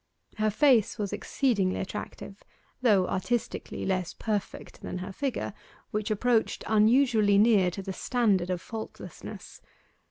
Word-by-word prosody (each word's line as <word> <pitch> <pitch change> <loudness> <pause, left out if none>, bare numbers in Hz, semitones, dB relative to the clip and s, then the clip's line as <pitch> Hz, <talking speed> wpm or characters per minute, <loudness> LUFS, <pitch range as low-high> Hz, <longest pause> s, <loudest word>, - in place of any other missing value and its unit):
Her 215 0 +2
face 235 -1 +3
was 205 -1 -3
exceedingly 210 -4 0
attractive, 195 +1 -7 0.4
though 205 -7 +4
artistically 240 +5 -2
less 185 -2 -1
perfect 210 -3 -4
than - - -5
her 185 +2 -5
figure, 260 -3 -3 0.4
which 210 0 -2
approached 225 +2 +1
unusually 220 -1 +4
near 205 -4 +5
to 195 +2 -6
the 190 0 -4
standard 200 -5 +1
of 180 -1 -2
faultlessness. 225 -2 -8
210 Hz, 125 wpm, -28 LUFS, 190-235 Hz, 0.4 s, near